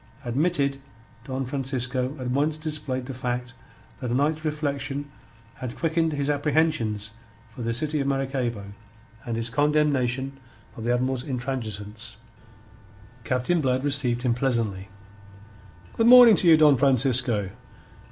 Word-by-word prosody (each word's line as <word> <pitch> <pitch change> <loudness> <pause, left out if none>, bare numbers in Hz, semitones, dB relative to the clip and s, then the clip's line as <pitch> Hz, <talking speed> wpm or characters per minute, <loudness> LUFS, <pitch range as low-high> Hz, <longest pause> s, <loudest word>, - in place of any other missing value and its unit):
Admitted, 140 +1 0 0.5
Don 130 0 -3
Francisco 130 0 -2
at 125 -1 -3
once 150 +4 0
displayed 150 -5 -3
the 135 - -6
fact 125 -1 -4 0.5
that 125 - -4
a 120 - 0
night's 150 +3 0
reflection 145 -2 -3 0.5
had 130 -3 -6
quickened 165 -1 0
his 140 -1 -2
apprehensions 145 -8 0 0.4
for 120 - -10
the 115 0 -1
city 150 +6 -1
of 140 - -1
Maracaybo 130 -7 -2 0.5
and 115 - -2
his 115 0 -4
condemnation 135 -2 +1 0.4
of 115 - -7
the 120 - +2
Admiral's 130 0 -1
intransigence. 115 -5 -5 1.1
Captain 130 +8 0
Blood 130 -1 0
received 135 -4 0
him 125 -2 +2
pleasantly. 115 -7 -1 1.1
"Good 225 - +2
morning 245 -3 +9
to 180 - +3
you, 160 -1 +8
Don 150 -3 +5
Francisco. 125 -6 +2
130 Hz, 130 wpm, -25 LUFS, 120-145 Hz, 1.1 s, morning